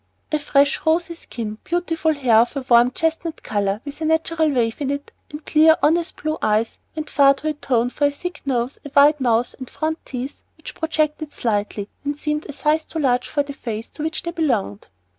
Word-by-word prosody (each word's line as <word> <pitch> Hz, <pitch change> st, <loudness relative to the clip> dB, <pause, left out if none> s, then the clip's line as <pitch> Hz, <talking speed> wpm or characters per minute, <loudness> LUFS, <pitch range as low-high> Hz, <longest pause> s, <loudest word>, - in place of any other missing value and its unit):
A 305 Hz, -, +1 dB
fresh, 285 Hz, -1 st, +2 dB
rosy 335 Hz, +2 st, +1 dB
skin, 225 Hz, -9 st, -7 dB
beautiful 330 Hz, -2 st, 0 dB
hair 250 Hz, -6 st, +3 dB
of 235 Hz, +5 st, +3 dB
a 275 Hz, -2 st, -4 dB
warm, 240 Hz, 0 st, +6 dB
chestnut 325 Hz, +4 st, -2 dB
color, 205 Hz, 0 st, -1 dB
with 285 Hz, +2 st, -8 dB
a -, -, 0 dB
natural 320 Hz, 0 st, +2 dB
wave 240 Hz, -2 st, 0 dB
in 275 Hz, -, -1 dB
it, 285 Hz, 0 st, -4 dB, 0.2 s
and 300 Hz, +1 st, -9 dB
clear, 315 Hz, +1 st, +5 dB
honest, 335 Hz, +3 st, +2 dB
blue 310 Hz, 0 st, -1 dB
eyes, 215 Hz, +1 st, +1 dB, 0.2 s
went 310 Hz, -1 st, -5 dB
far 275 Hz, 0 st, +6 dB
to 305 Hz, -, -6 dB
atone 250 Hz, -5 st, 0 dB
for 290 Hz, -, +2 dB
a -, -, -1 dB
thick 355 Hz, +5 st, -6 dB
nose, 255 Hz, -1 st, -1 dB
a 285 Hz, -, -8 dB
wide 290 Hz, +1 st, +6 dB
mouth, 240 Hz, -1 st, +2 dB
and 260 Hz, -, -7 dB
front 315 Hz, +1 st, -3 dB
teeth 260 Hz, +1 st, -6 dB
which 315 Hz, -, -9 dB
projected 310 Hz, -1 st, -1 dB
slightly 205 Hz, -4 st, -2 dB, 0.2 s
and 290 Hz, 0 st, -2 dB
seemed 300 Hz, +1 st, -2 dB
a -, -, -2 dB
size 305 Hz, +2 st, 0 dB
too -, -, -7 dB
large 255 Hz, -5 st, +1 dB
for 290 Hz, -, 0 dB
the 280 Hz, 0 st, -7 dB
face 225 Hz, -4 st, -6 dB
to -, -, -9 dB
which 320 Hz, +2 st, -2 dB
they 340 Hz, -, -3 dB
belonged. 245 Hz, -, -1 dB
285 Hz, 205 wpm, -21 LUFS, 245-315 Hz, 0.2 s, warm